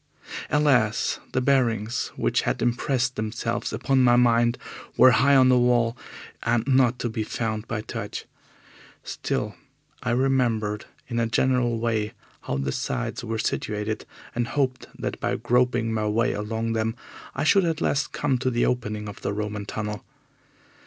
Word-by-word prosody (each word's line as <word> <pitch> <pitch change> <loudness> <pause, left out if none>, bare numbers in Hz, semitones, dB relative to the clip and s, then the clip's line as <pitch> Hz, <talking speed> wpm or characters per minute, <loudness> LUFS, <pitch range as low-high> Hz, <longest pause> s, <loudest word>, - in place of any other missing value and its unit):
Alas! 125 -8 +2
the 130 0 +1
bearings 120 -4 +1
which - - +1
had - - -1
impressed 125 +1 0
themselves 115 +2 -2
upon 135 -2 +1
my 120 -1 +5
mind 120 0 +4 0.4
were 130 - +8
high 140 +5 +4
on 130 -1 +6
the 125 -1 +5
wall, 120 -1 +3 0.5
and 120 0 +1
not 130 -2 +4
to 120 - -2
be 110 -1 -3
found 110 0 -3
by 110 -2 -2
touch. - - -6 0.8
Still, - - -3 0.5
I 125 - -2
remembered 120 -5 +1 0.2
in 120 -2 -2
a 115 - +1
general 120 0 +2
way 110 -2 -1 0.3
how 65 - -3
the 70 -1 -1
sides - - -3
were 115 -1 -3
situated, 105 0 -2 0.3
and 120 -1 -1
I - - -8
hoped 130 -3 0
that - - -4
by - - 0
groping 120 0 +1
my 110 -1 0
way 115 +4 +1
along 110 +2 -2
them 110 +1 -1 0.4
I - - -1
should 195 +5 +5
at 165 -2 0
last 145 +1 0
come 135 -4 0
to 130 - 0
the 120 -1 +1
opening 105 -4 -2
of 100 0 -9
the 100 - -2
Roman 105 0 -4
tunnel. 105 -1 -4
120 Hz, 160 wpm, -25 LUFS, 110-125 Hz, 0.8 s, were